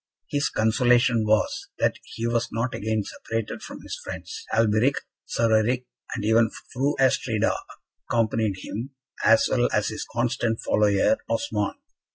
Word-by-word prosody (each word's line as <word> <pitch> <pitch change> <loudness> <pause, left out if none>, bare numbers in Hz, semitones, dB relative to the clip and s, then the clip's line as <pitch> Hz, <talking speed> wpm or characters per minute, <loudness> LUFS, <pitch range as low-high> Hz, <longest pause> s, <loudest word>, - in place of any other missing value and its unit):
His 145 -1 +1
consolation 120 0 +3
was, 110 0 +1
that - - +1
he 115 - -6
was 115 0 0
not 115 +3 -1
again 110 0 -1
separated 115 +2 -4
from - - -9
his - - -5
friends; - - -7
Alberic, 115 +4 +3 0.3
Sir 115 -1 +2
Eric, 125 +4 +1 0.3
and 105 - -3
even 110 +1 +4 0.2
Fru 140 +4 +1
Astrida, 115 -4 +2 0.6
accompanied 110 -3 +1
him, 130 +6 -6 0.3
as 115 0 +5
well 120 -1 +2
as 105 0 +1
his 110 - -4
constant 120 -1 0
follower, 105 - +3
Osmond. 285 - -1
115 Hz, 140 wpm, -25 LUFS, 110-125 Hz, 0.6 s, as